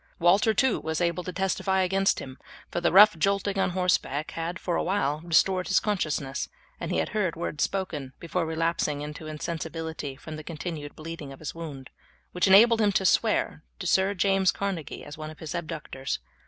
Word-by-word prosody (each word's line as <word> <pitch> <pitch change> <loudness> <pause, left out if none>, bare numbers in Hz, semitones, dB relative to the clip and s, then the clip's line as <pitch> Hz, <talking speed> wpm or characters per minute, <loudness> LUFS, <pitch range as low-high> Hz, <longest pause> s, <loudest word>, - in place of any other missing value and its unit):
Walter, 190 +7 +4
too, 230 +3 +2
was 160 0 -2
able 175 0 0
to 185 - -5
testify 190 +1 0
against 195 +1 +2
him, 130 0 -8 0.3
for 175 - -2
the - - +2
rough 205 +1 +8
jolting 200 +1 +1
on - - +2
horseback 175 -5 0
had 165 +2 -4
for 175 -2 -2
a - - +1
while 155 -6 0
restored 185 +2 +3
his 195 - +4
consciousness, 150 -9 -2 0.3
and - - -4
he - - +1
had - - 0
heard 205 -6 0
words 160 -3 -2
spoken, 155 -9 -3
before 170 +1 -2
relapsing 160 -2 0
into 150 +1 -7
insensibility 160 -2 -5
from 155 +3 -8
the 155 - -8
continued 155 -2 -6
bleeding 155 -3 -7
of 135 - -10
his 155 - -6
wound, 150 -6 -8 0.4
which 180 +2 +1
enabled 225 +4 +7
him 205 -1 +4
to 190 - +1
swear - - +2 0.2
to - - -7
Sir 190 +1 +2
James 195 0 +3
Carnegie 195 -6 -4
as 145 +2 -10
one 155 0 -5
of 155 - -11
his 160 +1 -6
abductors. 155 -5 -4
170 Hz, 190 wpm, -27 LUFS, 155-190 Hz, 0.4 s, rough